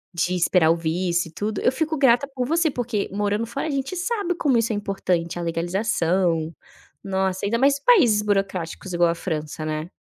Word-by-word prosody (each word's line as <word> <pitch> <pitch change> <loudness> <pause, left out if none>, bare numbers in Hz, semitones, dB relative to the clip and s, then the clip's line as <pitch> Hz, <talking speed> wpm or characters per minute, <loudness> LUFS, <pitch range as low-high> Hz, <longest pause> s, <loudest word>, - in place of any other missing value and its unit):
de 180 +2 0
esperar 175 -1 +3
o - - +3
visto 170 +2 -1
e - - -13
tudo, 210 +5 -3
eu 250 - +3
fico 315 +2 -2
grata 265 0 +4
por 250 -1 -1
você 330 +1 +2
porque, 240 -5 -2
morando 205 +2 -1
fora, 275 +5 -4
a - - -3
gente 275 +5 -3
sabe 365 -1 -1
como 280 -7 +2
isso 230 0 0
é - - -1
importante, 180 -4 -2
a - - -3
legalização. 170 -1 0 0.5
Nossa, 190 0 -1
ainda 230 - +1
mais 280 +1 +3
países 255 - +4
burocráticos 190 -3 -2
igual 175 -1 +3
a 170 - 0
França, 155 -3 -4
né? 155 +1 -3
195 Hz, 190 wpm, -23 LUFS, 170-250 Hz, 0.5 s, grata